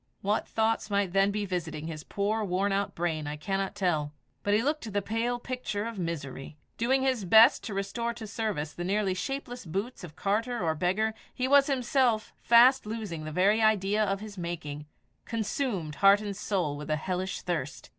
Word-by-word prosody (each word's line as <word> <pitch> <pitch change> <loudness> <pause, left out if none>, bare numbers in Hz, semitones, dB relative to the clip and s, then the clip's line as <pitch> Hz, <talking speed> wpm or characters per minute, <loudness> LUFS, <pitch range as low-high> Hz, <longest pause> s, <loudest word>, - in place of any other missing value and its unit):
What 205 +2 0
thoughts 220 0 0
might 200 -3 0
then 195 0 +4
be 205 0 -2
visiting 170 -5 -4
his 155 -2 -6
poor 210 +2 -1
worn 195 +1 0
out 200 0 -1
brain 160 -3 -2
I 150 - -3
cannot 195 +4 -2
tell; 165 -7 0 0.3
but 205 0 +2
he 220 - +2
looked 290 -5 -1
the 205 - +1
pale 230 +4 -1
picture 240 -4 -4
of 230 -3 -5
misery. 150 -4 -5 0.2
Doing 265 +3 +2
his 260 -5 +1
best 220 +7 +7
to 210 - -4
restore 200 +4 -2
to 225 -1 -7
service 205 -8 -3
the 175 - -5
nearly 195 +1 +1
shapeless 245 +5 -4
boots 195 +8 -4
of 160 -4 -9
carter 230 +5 -1
or 165 -3 +1
beggar, 190 +7 0 0.2
he 255 - 0
was 280 0 +6
himself 250 -4 +1
fast 245 +1 +6
losing 210 -8 -5
the 155 - -5
very 200 +7 +3
idea 215 -1 +3
of 195 -1 -1
his 210 -3 -8
making, 150 -4 -5 0.4
consumed 225 - -2
heart 200 +1 +7
and 205 -2 -4
soul 180 -8 -1
with 150 +1 -8
a 155 - +2
hellish 185 +4 -3
thirst. 165 -6 -4
200 Hz, 185 wpm, -29 LUFS, 175-225 Hz, 0.4 s, best